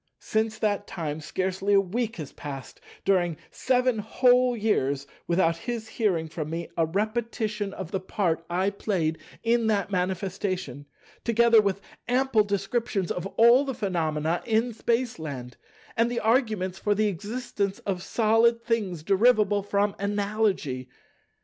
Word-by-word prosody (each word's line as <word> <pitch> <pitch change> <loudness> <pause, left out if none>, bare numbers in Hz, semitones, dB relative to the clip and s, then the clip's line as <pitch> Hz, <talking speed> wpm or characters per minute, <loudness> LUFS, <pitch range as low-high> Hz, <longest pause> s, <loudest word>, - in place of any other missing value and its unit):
Since 220 0 -1
that 205 -2 0
time, 155 -3 -4
scarcely 190 +4 0
a - - +7
week 225 +4 -2
has 155 -6 -7
passed 140 -3 -8 0.2
during 175 -5 +2
seven 250 -2 +1
whole 250 +3 +3
years, 140 -11 0 0.2
without 170 -1 +2
his 230 +1 -5
hearing 180 -8 0
from 155 -1 -5
me 165 +1 -4
a 165 -1 +2
repetition 215 +1 -2
of 190 -3 -7
the 190 - -1
part 185 -4 -1
I 185 +3 +1
played 175 -6 -1 0.2
in 230 0 +2
that 205 -2 0
manifestation, 185 -4 -2 0.4
together 235 -1 +5
with 200 -1 -1 0.3
ample 250 -3 +3
descriptions 200 -1 -1
of 180 +1 -3
all 235 +4 +7
the 270 -3 -4
phenomena 165 -5 -1
in 230 +1 +1
Spaceland, 160 - -2 0.4
and 230 +1 +2
the 240 - -1
arguments 215 -6 +1
for 210 -1 +1
the 215 +1 +2
existence 205 0 -2
of 190 -3 -2
Solid 230 +3 +3
things 200 -9 -1
derivable 205 +1 +4
from 200 0 0
Analogy. 200 - -1
200 Hz, 135 wpm, -26 LUFS, 175-225 Hz, 0.4 s, a